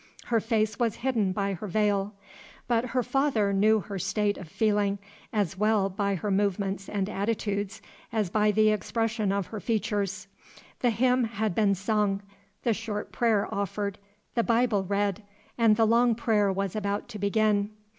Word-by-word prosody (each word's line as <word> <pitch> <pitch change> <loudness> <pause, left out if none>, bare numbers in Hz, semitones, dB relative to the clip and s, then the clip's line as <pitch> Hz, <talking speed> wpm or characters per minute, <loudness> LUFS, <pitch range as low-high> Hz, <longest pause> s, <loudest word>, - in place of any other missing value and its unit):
Her 230 -1 +2
face 220 -1 0
was 230 -3 +1
hidden 225 -8 +1
by 200 +1 -1
her 190 +3 -6
veil; 205 0 0 0.5
but 235 0 +2
her 250 0 0
father 235 -7 +1
knew 215 +2 +4
her 200 -1 -6
state 205 +3 0
of 180 - -9
feeling, 205 0 +1 0.3
as 195 -4 -1
well 210 -2 +2
by 200 +1 -1
her 200 +3 -2
movements 195 0 0
and 200 -2 -1
attitudes 205 -1 -2 0.3
as 215 -6 -1
by 210 0 +3
the 215 +1 +4
expression 220 -1 -1
of 200 -1 0
her 215 - -6
features. 210 -3 -1 0.5
The 245 - +2
hymn 250 +2 +2
had 220 -2 -2
been 200 0 +3
sung, 200 0 0 0.4
the 235 - +2
short 210 -1 -5
prayer 225 -4 +2
offered, 200 0 -2 0.3
the 235 - +2
Bible 230 -4 +2
read, 200 +1 -1 0.3
and 225 -2 +4
the 225 +1 +3
long 235 +1 +4
prayer 215 -3 +2
was 195 0 -2
about 205 -1 -2
to 215 -3 -7
begin. 205 0 +2
210 Hz, 165 wpm, -27 LUFS, 200-225 Hz, 0.5 s, knew